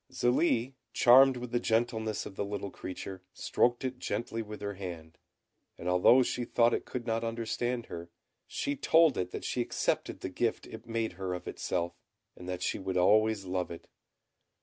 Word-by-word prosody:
Zélie, 125 0 +2 0.2
charmed 130 +2 +7
with 125 -1 -6
the 120 - +1
gentleness 110 -2 0
of - - -9
the - - -2
little 100 -1 -4
creature, 95 0 -7
stroked 120 +1 +1
it 130 -1 -3
gently 115 -2 -3
with 105 -1 -8
her 100 0 -4
hand, 85 -4 -8 0.6
and 85 - -7
although 90 +8 +6
she 125 0 -2
thought 120 0 +3
it - - -1
could 125 -2 -5
not 115 -1 -1
understand 115 +1 -2
her, 85 0 -8 0.4
she 145 - -2
told 160 +1 +4
it 90 0 -2
that - - -6
she 125 - -1
accepted - - -1
the - - -3
gift 115 +5 -1
it 115 +1 -10
made 115 -1 -1
her 90 -1 -1
of 90 - -8
itself, 85 -1 -2 0.4
and 90 0 -9
that 90 0 -3
she - - -1
would 95 -1 -2
always 105 +2 +4
love 90 -1 -2
it. 85 - -9
110 Hz, 180 wpm, -31 LUFS, 95-120 Hz, 0.6 s, charmed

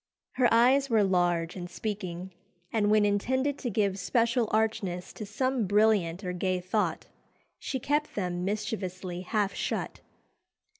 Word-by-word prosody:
Her 250 -2 +2
eyes 260 +4 +4
were 220 -3 +4
large 175 -3 +1
and 175 -2 -6
speaking, 190 -4 -5 0.4
and 210 -2 +2
when 210 0 +4
intended 260 +8 0
to 245 - -2
give 200 -2 0
special 235 0 +1
archness 200 -5 -1
to 215 - -7
some 255 +1 0
brilliant 205 -3 +2
or 180 -1 -3
gay 185 0 0
thought, 185 -2 -1 0.5
she 265 - -3
kept 295 +4 -1
them 180 -3 -2
mischievously 190 -3 -3
half 200 +1 0
shut. - - -3
205 Hz, 140 wpm, -29 LUFS, 180-230 Hz, 0.5 s, eyes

